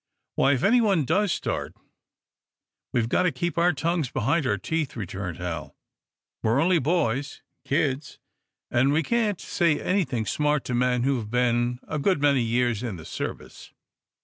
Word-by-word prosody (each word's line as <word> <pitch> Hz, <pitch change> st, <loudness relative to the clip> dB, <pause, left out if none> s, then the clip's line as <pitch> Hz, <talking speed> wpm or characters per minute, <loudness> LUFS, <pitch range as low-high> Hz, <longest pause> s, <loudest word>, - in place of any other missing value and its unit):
"Why, 140 Hz, -, +3 dB
if 130 Hz, -, -1 dB
anyone 205 Hz, -, +3 dB
does 190 Hz, +6 st, +2 dB
start, -, -, -3 dB, 1.2 s
we've 115 Hz, -2 st, +1 dB
got 120 Hz, -, +2 dB
to 180 Hz, -2 st, +2 dB
keep 170 Hz, +6 st, -2 dB
our 175 Hz, +1 st, +4 dB
tongues 165 Hz, -2 st, -1 dB
behind 135 Hz, +5 st, 0 dB
our -, -, +1 dB
teeth," 160 Hz, -3 st, -2 dB
returned 95 Hz, -5 st, -5 dB
Hal. 85 Hz, -4 st, -5 dB, 0.7 s
"We're 115 Hz, +4 st, +2 dB
only 170 Hz, +2 st, +3 dB
boys 140 Hz, -3 st, -1 dB, 0.2 s
kids 140 Hz, -2 st, -1 dB, 0.5 s
and 130 Hz, +3 st, +3 dB
we 155 Hz, +3 st, +2 dB
can't 215 Hz, -1 st, 0 dB
say 170 Hz, -5 st, +1 dB
anything 165 Hz, -, 0 dB
smart 150 Hz, +3 st, 0 dB
to 125 Hz, -, -3 dB
men 125 Hz, 0 st, +1 dB
who 135 Hz, 0 st, +2 dB
have 110 Hz, -3 st, -5 dB
been 120 Hz, 0 st, +1 dB
a 155 Hz, -, -3 dB
good 185 Hz, +2 st, +2 dB
many 140 Hz, -2 st, +3 dB
years 120 Hz, -1 st, +1 dB
in 120 Hz, -5 st, -4 dB
the 80 Hz, -2 st, -10 dB
service." -, -, -7 dB
135 Hz, 160 wpm, -25 LUFS, 120-165 Hz, 1.2 s, our